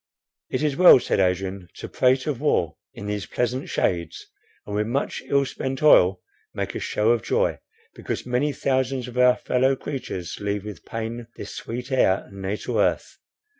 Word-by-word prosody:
"It - - -2
is 150 -3 +1
well," 180 -4 +8
said - - -1
Adrian, 95 0 -1
"to - - -7
prate 130 +1 +2
of 145 -5 -3
war 85 - +1 0.2
in 100 - -9
these 105 -1 -3
pleasant 125 +2 -2
shades, 85 -3 -1 0.4
and 105 - -5
with 105 +1 0
much 135 +4 -2
ill 140 0 +2
spent 135 +1 -4
oil 95 -10 +6 0.3
make - - -3
a - - -4
show 105 +2 +1
of 120 -2 +2
joy, - - 0 0.3
because - - -5
many 125 +4 0
thousand 130 -2 -1
of 125 - -10
our 125 0 +6
fellow 130 +2 +1
creatures 125 - -5
leave 100 0 -2
with 105 -2 -9
pain 115 +1 -5
this - - -8
sweet 125 +3 -6
air 100 -7 +3
and 100 0 -11
natal 95 +2 -2
earth. - - 0
120 Hz, 175 wpm, -24 LUFS, 100-130 Hz, 0.4 s, well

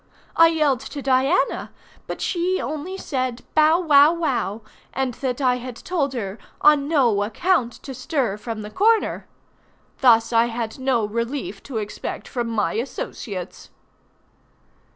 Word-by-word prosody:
I 330 - +7
yelled 305 -6 +2
to 285 - -7
Diana; 270 +6 +1 0.4
but - - -5
she 365 +1 0
only 310 +6 -4
said 255 -7 -3
"bow 310 +2 +5
wow 300 -3 +6
wow," 265 - -2 0.3
and 265 -2 -1
that 255 +1 -3
I 250 -2 +3
had 250 -1 -7
told 290 -3 -2
her 205 -4 -4 0.2
"on 295 -2 +5
no 250 -10 +3
account 240 - +1
to 270 - -7
stir 260 - -1
from 220 0 -6
the 210 - -8
corner." 440 - +2 0.7
Thus 230 -2 +4
I 230 +1 +4
had 230 0 -4
no 260 -4 +1
relief 235 0 -4
to 250 - -3
expect 210 -1 -5
from 240 -3 -3
my 225 -2 0
associates. 215 -5 -5
260 Hz, 140 wpm, -22 LUFS, 230-305 Hz, 0.7 s, I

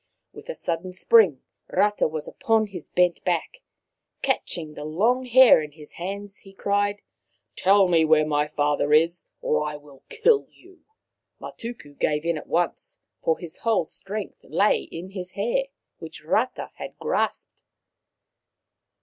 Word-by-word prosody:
With - - -13
a - - -4
sudden 175 +2 -3
spring 185 - +4 0.3
Rata 210 0 +2
was 155 -1 -5
upon 225 -1 +1
his 190 -6 -10
bent 180 -1 +2
back. 180 - -2 0.6
Catching 155 -3 -2
the 150 - -8
long 220 +12 +1
hair 250 -6 +7
in 150 -1 -8
his 150 -1 -13
hands, 200 +2 -5
he 195 - -16
cried: 205 +1 0 0.3
" 100 +2 -48
Tell 195 0 +4
me 165 -2 +4
where 155 -1 +4
my 150 -1 +1
father 145 0 0
is, 165 +3 +3 0.2
or - - +1
I 150 0 -4
will 145 -2 -17
kill 450 -1 +3
you." 365 0 -20 0.6
Matuku 230 -12 -8
gave 150 +1 0
in 170 0 +1
at - - -13
once, 175 +1 -1 0.2
for 160 - +1
his 170 -3 -8
whole 220 -7 +1
strength 205 +5 -6
lay 205 +2 +1
in 180 +3 -7
his 185 -2 -6
hair, 235 +7 0 0.3
which 160 -1 -10
Rata 225 +10 0 0.3
grasped. - - -2
180 Hz, 150 wpm, -24 LUFS, 155-210 Hz, 0.6 s, hair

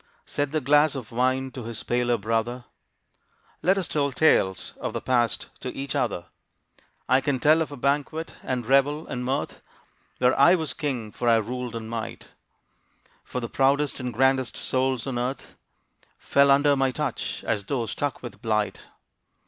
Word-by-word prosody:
Said 145 -1 -2
the 155 - +1
glass 145 +2 +4
of 125 -5 -7
wine 130 +2 0
to 125 -3 -7
his 115 -1 -5
paler 120 0 +1
brother, 115 +3 -2 1.0
"Let 190 +2 +3
us 185 -4 -1
tell 140 -2 0
tales 125 - +2
of - - -3
the - - -2
past 120 -3 0
to 130 - -5
each 135 0 -3
other; 100 -8 -1 0.8
I 130 +1 +4
can 135 -1 0
tell 155 +4 +5
of 155 - -2
a 145 - -7
banquet, 145 +4 -1
and 125 -2 -3
revel, 140 +5 +3
and 125 - -4
mirth, 135 +4 -2 0.6
Where 125 +1 +3
I 170 +7 +7
was 160 -4 -2
king, 125 -8 -3
for 120 +2 -1
I 115 - +6
ruled 120 +2 -2
in 115 -1 -5
might; 115 -1 -6 0.9
For 125 - -4
the 120 - -4
proudest 140 +3 +1
and 125 -1 -3
grandest 130 +1 +2
souls 130 -2 0
on 130 -3 -2
earth 125 +3 -4 0.6
Fell 140 0 +3
under 140 +1 +5
my 135 -1 +2
touch, 135 -1 -3
as 100 -2 -1
though 120 0 -1
struck 140 +6 -3
with 120 - -9
blight. 105 -3 -1
130 Hz, 170 wpm, -25 LUFS, 120-140 Hz, 1.0 s, I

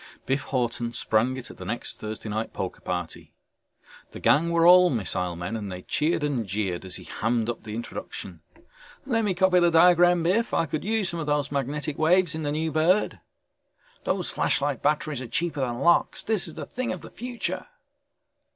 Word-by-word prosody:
Biff 135 +2 0
Hawton 120 -3 -1
sprang 120 +5 +1
it 125 - -6
at - - -14
the - - -8
next 110 +6 -2
Thursday 110 +1 -6
night 110 +1 -3
poker - - -5
party. - - -5 0.8
The - - -7
gang 160 +4 +3
were 170 0 +3
all 180 +1 +8
missile 90 - -1
men 90 +6 -4
and 105 -3 -5
they 90 0 -7
cheered 155 +1 0
and 130 -8 -1
jeered 95 -2 -2
as 95 - -6
he - - -8
hammed 115 0 -1
up 115 - -9
the 105 -1 -7
introduction. 120 - -7 0.6
"Let 230 -4 +1
me 200 -4 0
copy 185 0 +4
the 175 -1 +4
diagram, 175 +1 +5
Biff, 215 +8 +1
I 165 - +2
could 155 -1 -4
use 215 -3 +1
some 170 -2 -3
of 150 - -4
those 145 -2 0
magnetic 145 +1 -3
waves 170 +1 +4
in 160 - -4
the 145 -1 -1
new 160 +2 -1
bird!" 165 +6 +2 0.8
"Those 185 -2 -1
flashlight 140 -2 0
batteries 150 -2 0
are 125 - -6
cheaper 165 +4 -2
than 120 -2 -2
lox, 170 0 +3
this 215 -5 +1
is 160 - -8
the - - -6
thing 255 0 -3
of 185 - -5
the - - -11
future!" 245 +1 -4
150 Hz, 195 wpm, -26 LUFS, 120-175 Hz, 0.8 s, all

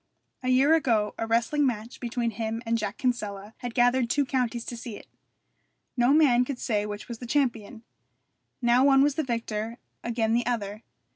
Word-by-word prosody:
A 255 - -2
year 265 +5 +5
ago 225 -10 +2
a 225 - -2
wrestling 235 +6 +1
match 230 -1 -4
between 235 -1 -2
him 225 +2 -4
and 230 0 +1
Jack 210 -3 -3
Kinsella 210 -5 -2
had 245 -2 -6
gathered 245 0 +3
two 285 +2 +2
counties 245 -3 -1
to 240 - -5
see 230 -2 -7
it. - - -14 0.9
No 245 +1 +3
man 280 -5 +5
could 255 0 -4
say 210 -4 -1
which 205 0 -7
was 235 -2 -7
the 245 - -7
champion. 235 -4 -1 0.8
Now 240 +2 +4
one 270 -1 +6
was 290 0 +3
the 315 - -1
victor, 230 -2 -3 0.3
again 225 -1 0
the 240 0 +1
other. 215 -3 -2
235 Hz, 185 wpm, -27 LUFS, 225-255 Hz, 0.9 s, one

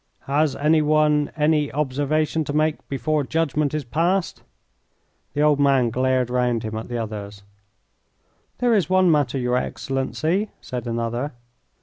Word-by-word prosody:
"Has 145 0 +1
any 155 +2 +3
one 150 -1 +2
any 150 -1 +2
observation 150 +3 0
to 145 - -4
make 155 0 0
before 145 +3 0
judgment 150 -1 0
is 155 - -2
passed?" 170 +9 0 0.9
The 145 - +1
old 150 -1 +4
man 135 -4 +3
glared 130 0 +1
round 125 -2 +1
him 110 0 -4
at 110 - -5
the 120 - -4
others. 105 -2 -6 1.1
"There 245 -1 +2
is 195 -6 +2
one 185 -2 +4
matter, 145 -4 +1
your 125 -1 0
Excellency," 155 +11 -2
said 125 -1 -6
another. 120 +4 -2
145 Hz, 140 wpm, -22 LUFS, 125-155 Hz, 1.1 s, old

